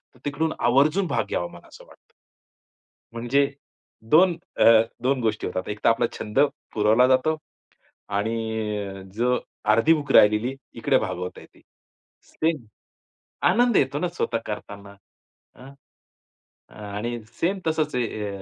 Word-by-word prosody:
तर - - -21
तिकडून 155 +2 -1
आवर्जून 150 +10 +3
भाग - - 0
घ्यावा, 85 - -1
मला 85 - -14
असं - - -15
वाटतं. - - -22 1.0
म्हणजे 120 +4 +1 0.7
2 175 +2 +6 0.2
अ, - - +3 0.4
2 130 +1 +1
गोष्टी 110 -2 -1
होतात. 90 +1 -4
एकतर 105 +1 +1
आपला 115 0 +2
छंद 105 +5 -2 0.3
पुरवला 110 +4 +4
जातो 130 +5 +2 0.8
आणि 110 +3 -1 0.5
अ, 95 0 -8
जो 125 +3 +1 0.3
अर्धी 115 +9 +4
भूक 145 -3 -2
राहिलेली 105 +5 +5 0.2
इकडे - - +2
भागवता 90 +1 -5
येते. - - -19 0.6
सेम 155 -6 -2 0.8
आनंद 240 -1 +3
येतो 140 +2 +1
ना 180 - 0
स्वतः 145 -9 -2
करताना. 100 -1 -8 0.6
हं. 135 +2 -13 1.0
आणि 105 +3 -5 0.2
सेम 190 +3 +1
तसंच 155 -3 0
आहे 110 -3 -2
125 Hz, 125 wpm, -24 LUFS, 105-150 Hz, 1.0 s, 2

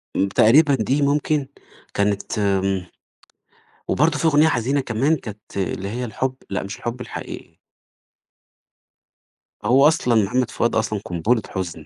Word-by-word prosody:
امم، 100 - +2
تقريبًا 140 +9 +5
دي 135 +5 0
ممكن 145 0 +1 0.5
كانت 100 +1 -1
امم 95 -2 0 1.0
وبرضه 150 +2 +2
في - - -1
أغنية 155 +1 +5
حزينة 135 +1 +1
كمان 130 +6 +1
كانت 105 -4 -10
اللي 95 +1 -2
هي 125 +3 -3
الحب 130 +4 -3
لأ 95 - -2
مش 100 +1 -7
الحب 120 +1 -5
الحقيقي. - - -8 2.1
هو 135 +6 +6
أصلًا 125 -7 +2
محمد 125 +5 0
فؤاد 120 - 0
أصلًا 110 -2 0
قنبلة 105 +7 0
حزن، 85 -5 -5
120 Hz, 130 wpm, -21 LUFS, 100-140 Hz, 2.1 s, هو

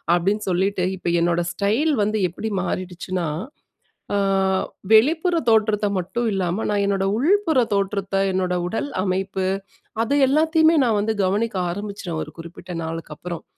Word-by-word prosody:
அப்படின்னு 200 +5 0
சொல்லிட்டு 185 +1 +1
இப்ப 175 -1 -2
என்னோட 170 0 +2
ஸ்டைல் 220 - +1
வந்து 215 +1 0
எப்படி 220 +6 -5
மாறிடுச்சுனா? 185 -1 -3 0.9
அ - - +2 0.8
வெளிப்புற 320 +10 +4 0.2
தோற்றத்த 215 -1 +2
மட்டும் 235 +7 -2
இல்லாம, 190 +2 -1
நான் 205 -1 +1
என்னோட 195 -1 0
உள்புறத் 315 - +2
தோற்றத்த, 195 0 -1 0.2
என்னோட 185 -1 0
உடல் 225 +9 -3
அமைப்பு, 190 0 -1 0.6
அது 255 - 0
எல்லாத்தயுமே 320 +3 +4
நான் 225 -4 +2
வந்து 220 +2 0
கவனிக்க 205 +2 0
ஆரம்பிச்சுறேன், 195 -3 -5
ஒரு - - -12
குறிப்பிட்ட 170 +2 -9
நாளுக்கப்பறம். 165 +1 -6
200 Hz, 130 wpm, -22 LUFS, 180-225 Hz, 0.9 s, வெளிப்புற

